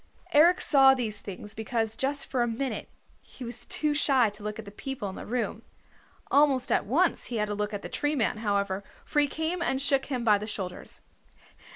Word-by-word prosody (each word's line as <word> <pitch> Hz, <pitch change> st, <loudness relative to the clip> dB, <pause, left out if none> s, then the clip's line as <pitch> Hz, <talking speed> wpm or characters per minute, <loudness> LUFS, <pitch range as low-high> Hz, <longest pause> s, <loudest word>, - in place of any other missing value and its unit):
Eric 335 Hz, +5 st, +6 dB
saw 270 Hz, -2 st, +6 dB
these 215 Hz, -5 st, -3 dB
things 205 Hz, +1 st, -8 dB
because 220 Hz, 0 st, -1 dB
just 275 Hz, +3 st, -1 dB
for 255 Hz, -, -1 dB
a 240 Hz, -, +2 dB
minute 245 Hz, +3 st, -3 dB, 0.3 s
he 260 Hz, -, -12 dB
was 240 Hz, 0 st, -4 dB
too 300 Hz, -1 st, 0 dB
shy 265 Hz, -6 st, +3 dB
to 210 Hz, +1 st, -9 dB
look 210 Hz, 0 st, -4 dB
at 225 Hz, -, -7 dB
the 200 Hz, -, -9 dB
people 260 Hz, 0 st, -5 dB
in 190 Hz, -, -8 dB
the -, -, -8 dB
room. 230 Hz, -2 st, -2 dB, 0.7 s
Almost 280 Hz, -3 st, +4 dB
at -, -, +2 dB
once -, -, +2 dB
he 245 Hz, -, -4 dB
had 210 Hz, -1 st, 0 dB
to -, -, -1 dB
look 210 Hz, 0 st, -2 dB
at 205 Hz, -1 st, -5 dB
the -, -, -4 dB
Tree 295 Hz, +1 st, -1 dB
Man, 225 Hz, -5 st, +1 dB
however, 200 Hz, -2 st, -1 dB, 0.2 s
for 295 Hz, -, +1 dB
he 290 Hz, -, +5 dB
came 320 Hz, +4 st, -2 dB
and 270 Hz, -6 st, 0 dB
shook 275 Hz, -1 st, +2 dB
him 255 Hz, -4 st, -2 dB
by 210 Hz, -3 st, +4 dB
the 210 Hz, -, -5 dB
shoulders. 190 Hz, -4 st, -5 dB
240 Hz, 215 wpm, -28 LUFS, 210-275 Hz, 0.7 s, Eric